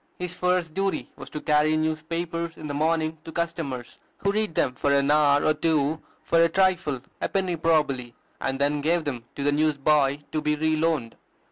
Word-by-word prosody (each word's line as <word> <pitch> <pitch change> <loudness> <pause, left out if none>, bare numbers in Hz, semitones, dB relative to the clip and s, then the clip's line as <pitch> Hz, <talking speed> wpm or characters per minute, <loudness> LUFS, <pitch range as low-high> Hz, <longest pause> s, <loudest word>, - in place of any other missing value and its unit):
His 180 0 -4
first 180 -3 0
duty 195 +2 -2
was 135 - -10
to 150 - -5
carry 150 +1 +3
newspapers 165 +2 -2
in 155 - -8
the 145 - -4
morning 160 +1 0
to 160 - -8
customers, 160 -8 -4 0.2
who 200 - 0
read 215 -5 -1
them 125 - +1
for 140 +3 0
an 140 0 +3
hour 145 -1 +4
or 155 - +4
two 155 -1 0 0.2
for 165 - +3
a 170 - +4
trifle, 175 -7 +1 0.2
a - - -1
penny 190 -3 0
probably, 150 -7 0 0.2
and 135 0 -2
then 145 +1 +1
gave 165 +3 +1
them 125 -6 -4
to 140 - -4
the 145 - +3
newsboy 145 -1 +2
to 155 - -1
be 150 0 +1
re 155 +1 +1
loaned. 155 -7 -1
155 Hz, 195 wpm, -25 LUFS, 145-165 Hz, 0.2 s, hour